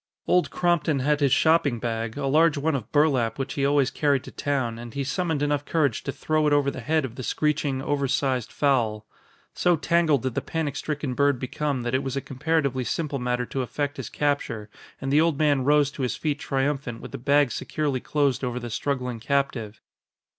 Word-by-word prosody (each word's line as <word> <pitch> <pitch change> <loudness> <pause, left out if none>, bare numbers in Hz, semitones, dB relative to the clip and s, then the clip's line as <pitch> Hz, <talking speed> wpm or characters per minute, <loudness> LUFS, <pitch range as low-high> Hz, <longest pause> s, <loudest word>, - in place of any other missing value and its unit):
Old 180 - +3
Crompton 170 -4 +1
had 150 +2 +2
his 140 -3 +2
shopping 160 -5 +3
bag, 115 0 -3
a 140 - -2
large 155 +3 +4
one 155 +3 0
of 125 -5 -4
burlap 140 -7 +2
which 135 0 -3
he 140 - -2
always 140 -1 +3
carried 140 -3 +1
to - - -10
town, 130 -5 -2
and 120 -1 -9
he 140 - -1
summoned 160 +1 -1
enough 145 -1 0
courage 145 -6 0
to 140 - -2
throw 155 +2 0
it 145 - +3
over 140 -1 +3
the - - -7
head 155 +4 +1
of 120 -2 -8
the - - -4
screeching, 145 0 0
over 140 -1 0
sized 130 -2 0
fowl. 115 -7 +1 0.5
So 175 -1 +3
tangled 160 -3 +2
did 130 -2 -1
the - - -1
panic 155 -4 -3
stricken 150 -3 -3
bird 140 +1 +2
become 130 +1 -2
that 120 +1 -2
it 130 - +2
was 135 0 -3
a - - +2
comparatively 140 -1 -1
simple 145 +1 -2
matter 125 0 -1
to 135 - -3
effect 145 +3 -3
his 130 -5 -5
capture, 120 -8 -2 0.3
and 135 +1 -2
the 150 - +6
old 165 -3 +2
man 145 -4 +2
rose 145 0 +4
to 150 - -7
his 125 - -1
feet 150 -2 -2
triumphant 135 -3 -2
with - - -9
the - - -6
bag 140 0 +3
securely 145 0 -2
closed 140 -1 0
over 125 -1 -2
the 120 -1 -6
struggling 125 -1 -2
captive. 120 -5 -1
140 Hz, 210 wpm, -25 LUFS, 125-150 Hz, 0.5 s, the